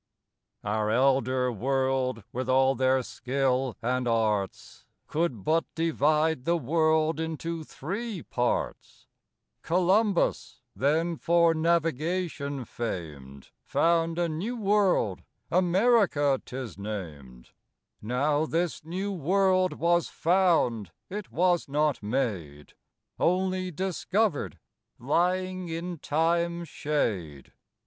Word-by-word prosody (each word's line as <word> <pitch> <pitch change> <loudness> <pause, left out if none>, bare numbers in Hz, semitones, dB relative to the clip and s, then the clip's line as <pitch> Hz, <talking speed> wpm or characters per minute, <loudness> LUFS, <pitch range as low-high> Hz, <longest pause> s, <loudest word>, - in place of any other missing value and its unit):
Our 105 +1 -1
Elder 130 +1 +2
World, 130 0 0
with 130 +1 -3
all 130 +1 +4
their 130 0 +2
Skill 130 0 -1
and 125 +1 0
Arts, 110 -4 -1 0.2
Could 150 - -2
but 160 - +2
divide 155 -2 +1
the 170 +1 +2
World 155 +2 +1
into 160 0 -4
three 195 - -5
Parts: 125 0 -3 0.6
Columbus, 185 +3 +1 0.2
then 160 +5 +1
for 170 0 +3
Navigation 160 -3 -1
fam'd, 75 - -6
Found 165 0 +1
a 175 -1 +1
new 185 +10 -3
World, 195 - +2 0.3
America 180 - +3
'tis 125 -5 -7
nam'd; 75 -12 -7 0.5
Now 145 +7 0
this 170 0 -1
new 185 +5 -3
World 185 +2 +2
was 170 0 +1
found, 165 - +2 0.2
it 205 -1 -6
was 175 -1 +2
not 150 0 +1
made, 105 - -3 0.5
Onely 185 +1 +1
discovered, 190 +1 -1 0.4
lying 180 +6 0
in 170 +1 -5
Time's 170 +3 0
shade. 95 - -2
155 Hz, 95 wpm, -27 LUFS, 125-175 Hz, 0.6 s, all